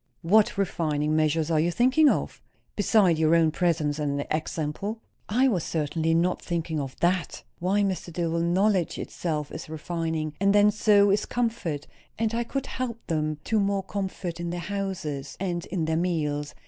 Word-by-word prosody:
"What 205 +5 +4
refining 155 -5 0
measures 155 +1 +1
are 155 - +3
you 165 +3 +2
thinking 260 - +4
of? - - -2 0.3
beside 200 -5 +3
your 160 +1 +4
own 165 -1 +4
presence 160 -3 0
and 145 -1 -1
example." 160 +7 -2 0.3
"I 255 +5 +3
was 190 -10 +1
certainly 160 +1 0
not 175 +2 +1
thinking 165 -2 -2
of 135 -2 -6
that. 175 -2 0 0.2
Why, 195 +4 +1
Mr. 190 -3 -2
Dillwyn, 170 0 0
knowledge 190 -1 +2
itself 150 -4 -3
is - - -7
refining; 160 -1 -3
and 200 +1 +3
then, 205 0 +6
so 205 -1 +4
is 200 - +1
comfort; 225 -12 -2 0.3
and 225 0 0
I 235 +1 0
could 275 +3 -3
help 235 -3 -5
them 155 -2 -1
to 220 - +1
more 200 -1 +1
comfort, 190 -3 -4
in 170 0 -3
their 175 +1 -3
houses, 175 -7 -4
and 175 -2 -3
in 170 -4 -2
their 160 0 0
meals. 150 -4 -1
170 Hz, 170 wpm, -26 LUFS, 155-200 Hz, 0.3 s, then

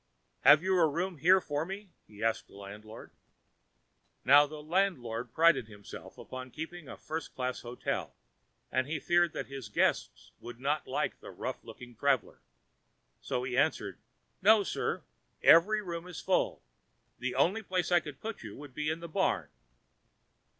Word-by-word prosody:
"Have 155 +3 +7
you 190 -1 +2
a 165 - +6
room 170 +2 -2
here 185 +6 +6
for 145 -3 -2
me?" 195 +2 -7 0.2
he 105 0 -10
asked 115 0 0
the - - -18
landlord. 105 +3 -10 1.1
Now 145 +1 +7
the 150 0 -9
landlord 155 -10 -1
prided 160 -8 +4
himself 100 -2 -11
upon 130 0 -8
keeping 160 +2 -7
a - - -8
first 160 0 -6
class 125 -1 -2
hotel, 120 +1 -4 0.6
and 130 0 +1
he 150 +1 -2
feared 175 +2 +3
that - - -4
his 135 -5 -8
guests - - 0
would 120 0 -9
not 145 +3 -1
like - - -2
the - - -10
rough - - -5
looking 120 -1 -11
traveler. 135 0 0 0.8
So 125 - -2
he 125 -1 -3
answered: 130 - +1 0.4
"No, 210 +1 +6
sir. - - -2 0.4
Every 210 +6 +6
room 170 -1 -5
is 180 - -7
full. - - 0 0.6
The 125 0 -2
only 180 +11 +2
place 185 -3 -1
I 175 - +6
could 150 -4 -9
put 220 -1 -5
you 105 -3 -8
would 145 -2 -11
be 150 +3 -2
in 160 +1 -3
the 170 - -6
barn." 160 - 0
150 Hz, 165 wpm, -31 LUFS, 125-175 Hz, 1.1 s, Have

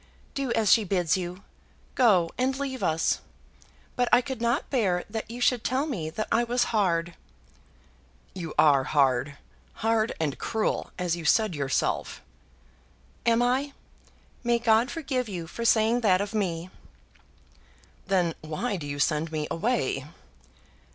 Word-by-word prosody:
Do 275 -3 -2
as 215 -4 +2
she 225 - +6
bids 180 -4 +1
you. 180 0 -5 0.5
Go, 190 -10 +4
and 260 +1 0
leave 265 -2 -4
us; 160 0 +1 0.8
but 245 -1 +1
I 245 - +7
could 260 -2 -6
not 235 0 0
bear 195 -9 +1
that 220 -1 -4
you 235 +2 -7
should 245 -1 +2
tell 265 +3 0
me 190 - -3
that 215 +7 -4
I 235 - +3
was 240 +1 +1
hard." 175 -5 +1 1.2
"You 170 -4 -6
are 140 -3 +5
hard; 135 0 +1 0.5
hard 225 0 +2
and 150 -4 -2
cruel, 220 -1 -1
as 180 -2 0
you 170 - -7
said, 215 +5 +3
yourself." 140 -3 -1 1.0
"Am 230 +1 +4
I? 265 +3 0 0.7
May 240 0 +2
God 230 +1 +3
forgive 265 -7 -2
you 175 -4 -5
for 230 +8 -6
saying 230 +1 +3
that 190 -5 +4
of 200 +2 -3
me!" 180 -4 -2 1.4
"Then 180 -3 +2
why 175 +8 -3
do 150 -4 -6
you 145 0 -4
send 155 +2 0
me 155 -1 -2
away?" 165 - -1
205 Hz, 145 wpm, -27 LUFS, 165-240 Hz, 1.4 s, I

